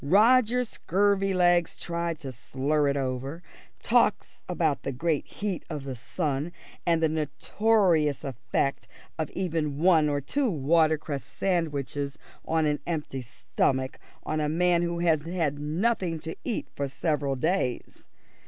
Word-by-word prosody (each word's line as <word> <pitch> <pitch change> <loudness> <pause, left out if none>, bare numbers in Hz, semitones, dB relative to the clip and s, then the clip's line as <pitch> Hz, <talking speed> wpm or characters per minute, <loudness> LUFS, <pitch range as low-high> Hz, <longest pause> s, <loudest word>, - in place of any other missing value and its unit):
Roger 230 - +5
Scurvilegs 190 -5 +2
tries 170 -1 -3
to 140 -4 -7
slur 140 +4 0
it 140 0 +1
over; 135 +5 -3 0.4
talks - - +2
about 165 -5 +1
the 140 - -3
great 150 +3 -1
heat 200 -4 -4
of 150 -4 -4
the 135 -2 -5
sun, 145 +4 -2 0.4
and 165 -1 +3
the - - +5
notorious 160 - +1
effect 140 +1 -2 0.3
of 155 - -1
even 160 -6 -1
one 160 -2 +4
or 145 -1 0
two 260 - 0
watercress 155 - +1
sandwiches 145 -5 -2 0.3
on 160 -1 +2
an 150 -1 +1
empty 150 -6 -3 0.4
on 130 +3 -1
a 150 - 0
man 175 +2 +3
who 170 0 -1
has 165 -3 +2
had 160 -3 -1
nothing 170 +3 0
to 160 +1 -6
eat 235 - -2
for 140 - -1
several 140 -1 -1
days. 135 -3 -2
160 Hz, 135 wpm, -27 LUFS, 140-175 Hz, 0.4 s, Roger